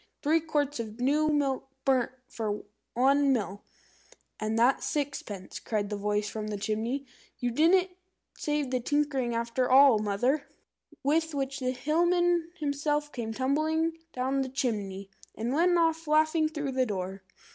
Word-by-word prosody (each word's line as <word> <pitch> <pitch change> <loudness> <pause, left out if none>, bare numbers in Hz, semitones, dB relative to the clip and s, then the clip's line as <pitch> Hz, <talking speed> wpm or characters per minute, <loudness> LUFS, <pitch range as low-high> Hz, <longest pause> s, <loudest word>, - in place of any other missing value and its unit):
Three 310 +3 +4
quarts 295 -3 -1
of 220 0 -6
new 295 +5 +2
milk 275 -3 0 0.2
burnt 260 -2 +2
for 210 -2 -3 0.3
one 275 +3 +4
meal!" 205 -5 -1 0.8
"And 215 +1 -1
that's 245 +4 +3
sixpence," 270 -10 -4
cried 210 -2 -2
the - - -1
voice 210 +1 -1
from 215 0 -4
the 210 -1 -3
chimney. 220 +7 -2 0.3
"You 245 -1 -1
didn't 360 +8 +4 0.4
save 295 -3 -1
the 255 - +1
tinkering 270 -2 0
after 235 +2 0
all 265 -3 +7
Mother!" 230 +8 0 0.6
With 320 +2 +1
which 270 0 -2
the 255 -1 -1
Hillman 340 +5 +2
himself 295 0 -1
came 230 -3 -4
tumbling 315 +6 0
down 265 +2 0
the 265 - -2
chimney, 200 -7 -3 0.2
and 235 +3 -2
went 350 +4 +3
off 325 -1 +1
laughing 310 +1 +3
through 295 -3 -3
the 255 -1 +1
door. 190 -1 -4
270 Hz, 145 wpm, -29 LUFS, 225-300 Hz, 0.8 s, all